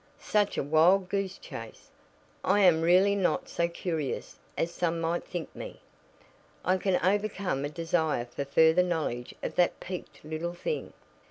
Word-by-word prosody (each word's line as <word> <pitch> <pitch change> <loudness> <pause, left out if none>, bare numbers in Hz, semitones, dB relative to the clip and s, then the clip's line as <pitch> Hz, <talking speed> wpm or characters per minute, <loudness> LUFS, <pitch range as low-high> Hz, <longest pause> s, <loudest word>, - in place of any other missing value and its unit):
Such 205 -1 0
a - - +1
wild 170 +6 +4
goose 195 -1 -2
chase! - - -10 0.5
I 205 - +3
am 175 -4 +5
really 185 +4 +5
not 195 -3 0
so 170 - 0
curious 165 -5 -3 0.2
as 170 - 0
some 170 -1 0
might 165 +1 -1
think 175 -2 -6
me. - - -8 0.9
I 185 +1 +3
can 185 -1 +1
overcome 200 -7 0
a - - -3
desire 160 -5 0
for 125 +3 -5
further 160 +5 +4
knowledge 160 -9 -2
of - - -3
that 175 - +3
peaked 180 -4 -8
little 160 +3 -4
thing. 460 - -4
175 Hz, 155 wpm, -29 LUFS, 160-185 Hz, 0.9 s, am